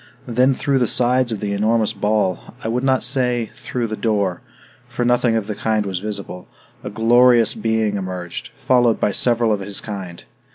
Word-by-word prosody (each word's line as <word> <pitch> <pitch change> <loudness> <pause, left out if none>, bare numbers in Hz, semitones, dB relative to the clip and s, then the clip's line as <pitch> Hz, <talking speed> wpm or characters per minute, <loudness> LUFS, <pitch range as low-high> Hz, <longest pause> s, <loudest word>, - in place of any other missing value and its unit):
Then 125 +2 +2
through 140 -1 0
the 120 - +1
sides 125 +1 +2
of 110 - -4
the 100 -1 -2
enormous 110 +1 +1
ball 105 -3 -1
I - - -3
would 120 +3 -1
not 130 -1 +2
say, 125 -3 +1
through 125 -2 -4
the 110 -1 -4
door, 100 -5 -1 0.5
for 120 - -3
nothing 120 -1 +2
of 110 -3 -1
the 105 - -4
kind 110 0 -1
was 95 -2 -3
visible 100 -3 -6 0.4
a - - -5
glorious 120 0 +4
being 110 -2 -1
emerged, 90 -2 -6
followed 120 -3 +2
by - - +1
several 115 +1 +2
of 105 - -2
his 100 0 -5
kind. 95 -5 -7
110 Hz, 180 wpm, -20 LUFS, 100-120 Hz, 0.5 s, glorious